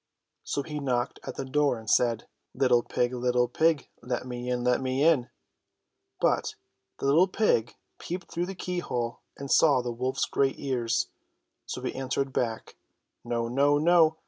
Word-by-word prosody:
So 140 - -2
he 150 -1 -5
knocked 125 -3 -1
at - - -6
the 135 - -4
door 140 -1 +1
and 110 0 -12
said: 115 0 +2 0.3
^^ - - -13
Little 125 -3 +4
pig! 120 +1 -1
Little 125 0 +1
pig! 155 +3 +1
Let 125 0 -3
me 125 0 -5
in! 125 -1 -1
Let 125 +1 +2
me 130 +2 0
in 150 -7 +3 0.5
/ - - -54
But - - +1 0.4
the - - -5
little 160 +7 +5
pig 180 - +1 0.2
peeped 180 +1 -6
through 175 +1 -2
the 195 - -6
keyhole 125 -11 -3 0.2
and 140 -1 -6
saw 145 -5 +5
the 120 0 -3
wolf's 130 +3 -1
great 135 -1 0
ears, 125 -4 -1 0.6
so - - -5
he - - -2
answered 135 +1 -2
back: 115 -3 -2 0.5
''No! 120 -1 -1
No! 140 +4 +3
No 160 0 +4
130 Hz, 170 wpm, -28 LUFS, 120-150 Hz, 0.6 s, little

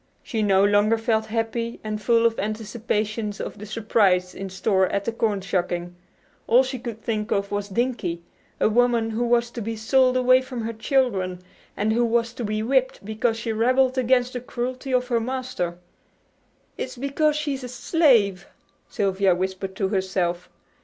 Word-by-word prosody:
She 225 - -2
no 195 -1 +4
longer 205 +2 +3
felt 220 -1 0
happy, 230 +1 -2
and 215 -1 -4
full 230 +1 +3
of 230 -1 +2
anticipations 215 0 -2
of - - -6
the 210 - -8
surprise 200 -4 +2
in 195 0 -6
store 190 0 +1
at 200 +1 -2
the - - 0
corn 215 -3 0
shucking. 175 -2 -2 0.5
All 245 +3 +6
she 260 -1 -4
could 230 -2 -7
think 215 -1 -2
of 200 0 -1
was 205 0 -2
"Dinkie," 200 -6 -2 0.4
a - - +4
woman 235 0 +2
who 225 +2 -1
was 240 0 +2
to 240 - -6
be 225 +1 -3
sold 255 +3 +3
away 255 0 +5
from 255 -2 -6
her 225 +1 -3
children, 210 -8 0 0.3
and 215 +2 +1
who 240 +2 +2
was 235 0 +1
to 240 - -5
be 215 0 -2
whipped 260 -3 0
because 220 +2 0
she 230 -1 -3
rebelled 255 +3 +2
against 255 0 +2
the 250 - -4
cruelty 255 +2 -4
of 250 0 +1
her 235 -2 +2
master. 250 -8 -3 1.0
"It's - - -5
because 280 +3 +1
she's 290 -3 -2
a 250 - -6
slave," 235 - +2 0.4
Sylvia 195 -2 +1
whispered 190 +1 -3
to 190 -1 -1
herself. 185 -3 -1
225 Hz, 175 wpm, -24 LUFS, 200-245 Hz, 1.0 s, All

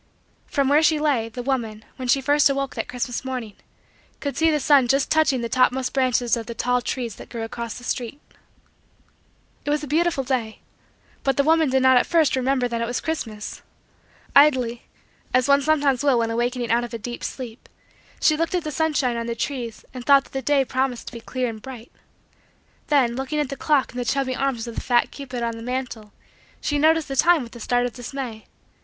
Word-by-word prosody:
From 280 -2 0
where 290 +3 +5
she 315 0 +4
lay, 270 -7 +1
the 245 +2 -6
woman, 230 -5 -2
when 255 -2 -5
she 270 +3 +3
first 290 +2 +4
awoke 275 0 -1
that - - -4
Christmas 245 0 -3
morning, 250 -5 -5 0.7
could 285 -1 -3
see 325 0 +3
the 305 -1 +2
sun 275 -3 +4
just 270 +2 +1
touching 310 -5 +3
the 235 - -2
topmost 255 +1 +1
branches 250 -3 +2
of 230 -2 -6
the 235 - -6
tall 250 +2 +1
trees 240 -2 -4
that - - -11
grew 230 -2 -5
across 230 0 -5
the 245 - -11
street. 245 +2 -3 1.4
It - - -4
was 295 0 0
a - - -5
beautiful 320 -1 +1
day. 245 -4 -2 0.6
But 270 -2 +1
the 280 - +4
woman 320 0 +3
did 265 0 +2
not 260 -1 +6
at - - +2
first 320 -5 +3
remember 260 -1 +1
that 235 -1 -3
it 230 - -1
was 245 - -2
Christmas. 220 -10 -5 0.7
Idly, 255 -5 +4 0.5
as 255 +1 +3
one 280 0 +5
sometimes 285 -3 +2
will 275 -4 +4
when 230 -1 0
awakening 240 +1 -1
out 235 +1 +3
of 240 -1 -6
a - - -2
deep 240 +2 -7
sleep, 245 -3 -7 0.5
she 310 - +4
looked 330 +3 -1
at 355 - 0
the 305 - -4
sunshine 290 -5 0
on 230 0 -3
the 235 - -2
trees 235 -2 -4
and 250 -2 -7
thought 275 +1 +6
that - - -21
the 270 - -2
day 280 -1 +2
promised 260 -1 -1
to - - -20
be 230 - -8
clear 255 +2 -2
and 220 -2 -6
bright. 250 -2 -10 1.0
Then, 260 -5 +3
looking 270 +4 -2
at 295 -3 -1
the 275 - -4
clock 280 0 +1
in - - -10
the 245 - -2
chubby 265 0 0
arms 260 -4 -1
of 235 - -7
the - - -4
fat 240 -2 +2
cupid 255 -4 -6
on 230 -1 -2
the - - -8
mantle, 245 -3 -5 0.5
she 290 -1 -1
noticed 320 +1 +3
the 270 - -4
time 335 0 +4
with 235 0 -12
a - - -9
start 245 +2 +1
of 245 - -4
dismay. 245 -3 -7
255 Hz, 215 wpm, -23 LUFS, 240-280 Hz, 1.4 s, not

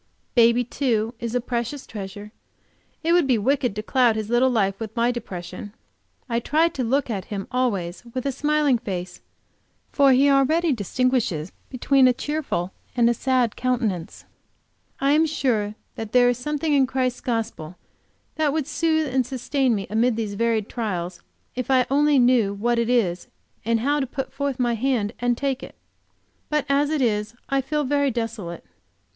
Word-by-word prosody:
Baby, 235 0 +5
too, 235 -3 -1
is 235 0 -4
a - - +3
precious 240 +3 -3
treasure; 205 0 -8 0.7
it 335 +1 +2
would 345 -5 +4
be 250 -3 +3
wicked 250 0 0
to 215 - -4
cloud 245 -1 +3
his 220 0 -4
little 245 +2 +4
life 195 -5 0
with 220 -1 -6
my 235 +1 +2
depression. 185 -3 -7 0.5
I 235 -2 0
try 310 +7 +2
to 265 - -4
look 255 +2 0
at 195 -4 -3
him 200 -2 -5
always 205 -9 -1
with 255 - -3
a 275 - +1
smiling 295 -2 +1
face, 180 -5 -5 0.7
for 280 -2 +5
he 265 +2 +5
already 290 +4 +3
distinguishes 220 -6 -1 0.2
between 265 +1 +3
a 250 - +4
cheerful 265 - -3 0.2
and 240 -2 +4
a 240 - +4
sad 250 -2 +1
countenance. 230 -9 -2 0.7
I 275 +1 +2
am 315 +2 +4
sure 225 -9 0 0.2
that 220 -1 -7
there 245 -1 +6
is 245 0 -1
something 300 +3 -1
in 270 -2 +4
Christ's 255 -1 -1
gospel 220 -9 -3 0.6
that 310 -2 +2
would 305 -1 -1
soothe 315 -1 0
and 260 -1 +3
sustain 260 0 0
me 195 -2 -3
amid 225 +4 +1
these 215 -2 -3
varied 225 0 0
trials, 180 -6 -4 0.3
if 255 +1 -4
I 255 -2 +4
only 290 +1 +4
knew 240 -5 +3
what 235 +3 0
it 235 0 0
is, 190 -8 +1 0.4
and 230 0 +1
how 290 +4 +1
to 270 - -1
put 265 +1 -5
forth 280 -1 -2
my 240 -2 +1
hand 230 -3 0
and 245 0 +1
take 275 -1 -1
it. - - -10 0.7
But 300 -2 0
as 280 +1 +2
it 305 -3 +1
is 210 -1 -1
I 275 0 +2
feel 300 +3 -1
very 285 +1 +1
desolate. 225 -8 -4
245 Hz, 175 wpm, -23 LUFS, 220-275 Hz, 0.7 s, there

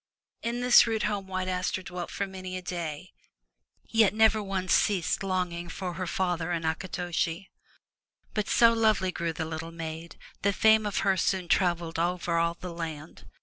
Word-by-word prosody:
In 235 +1 -2
this 245 -1 +7
rude 220 -1 0
home 205 -2 -2
White 185 -1 -3
Aster 185 0 -1
dwelt 175 -1 -6
for 200 - -2
many 185 -1 -6
a - - -6
day, 170 - -5 0.8
yet 220 -2 +3
never 220 0 +4
once 195 -2 -1
ceased 190 -6 +2
longing 180 -3 -2
for 180 +1 -4
her 185 +1 -4
father 175 -2 -1
and 165 -2 -2
Akitoshi. 175 +1 -2 0.8
But 210 -2 -1
so 230 -1 +6
lovely 215 -5 +2
grew 170 -2 -2
the 160 0 -4
little 160 +1 -5
maid, 165 0 -7 0.3
that 200 -1 +1
fame 220 -1 +5
of 205 - -1
her 195 -1 +3
soon 185 +1 0
traveled 170 -3 +1
over 175 0 0
all 170 0 +1
the 180 0 -7
land. 160 -2 -7
185 Hz, 170 wpm, -28 LUFS, 170-200 Hz, 0.8 s, this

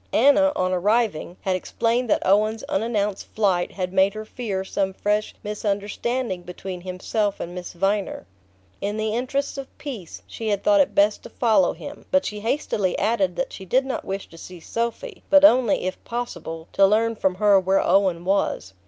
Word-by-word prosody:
Anna, 285 +3 +5
on 185 0 0
arriving, 195 -2 0
had 190 -1 0
explained 230 +6 -1
that - - +1
Owen's 215 +3 +2
unannounced 210 -2 -1
flight 190 -5 +1
had 185 -1 -3
made 195 +1 +3
her 215 0 -6
fear 210 -5 -4
some 190 0 -1
fresh 210 +2 -1
misunderstanding 210 +1 -2
between 180 +1 -7
himself 195 +3 -2
and 175 - -5
Miss 180 0 -7
Viner. 195 - -1 0.6
In 205 +2 -2
the 215 0 -1
interests 275 +4 -2
of 270 - -10
peace 235 - -8
she 225 - -6
had 205 -2 0
thought 305 -1 +5
it 285 - 0
best 205 +1 +3
to - - -11
follow 215 -7 +2
him; 285 - -10
but 280 0 +2
she 210 0 -4
hastily 210 -5 -1
added 200 -4 +1
that 265 - -3
she 190 - -8
did 255 +8 +2
not 265 - -3
wish 195 0 -5
to 165 - -14
see 180 0 -10
Sophy, 235 - -4
but 290 0 +7
only, 250 -6 +4
if 185 0 -4
possible, 175 -9 -5
to 195 - +5
learn 225 +3 +2
from 190 -3 0
her 200 0 +5
where 190 +1 +1
Owen 185 -3 +2
was. 190 - 0
205 Hz, 180 wpm, -23 LUFS, 190-235 Hz, 0.6 s, but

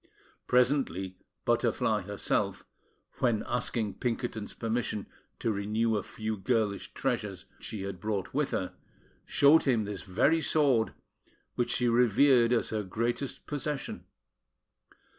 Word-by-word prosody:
Presently, 125 - +1 0.3
Butterfly - - +2
herself, - - -1 0.5
when 115 -4 +2
asking 115 -3 -2
Pinkerton's 120 -3 -3
permission 115 -2 -2 0.3
to 115 - 0
retain 110 +3 0
a 105 - 0
few 110 0 -4
girlish 105 -1 0
treasures 95 -2 -2
she 105 -4 -4
had 100 -2 -5
brought 100 -1 -3
with 145 +1 +1
her, 90 - -2 0.5
showed 145 +3 +5
him 120 -5 +3
this 100 -2 -5
very 140 - +2
sword, 135 -8 +2 0.6
which 120 - -1
she 125 - +2
revered 120 +1 +5
as 120 - +1
her 110 -1 0
greatest 115 +7 -3
possession. 145 -1 -4
115 Hz, 120 wpm, -30 LUFS, 105-125 Hz, 0.6 s, showed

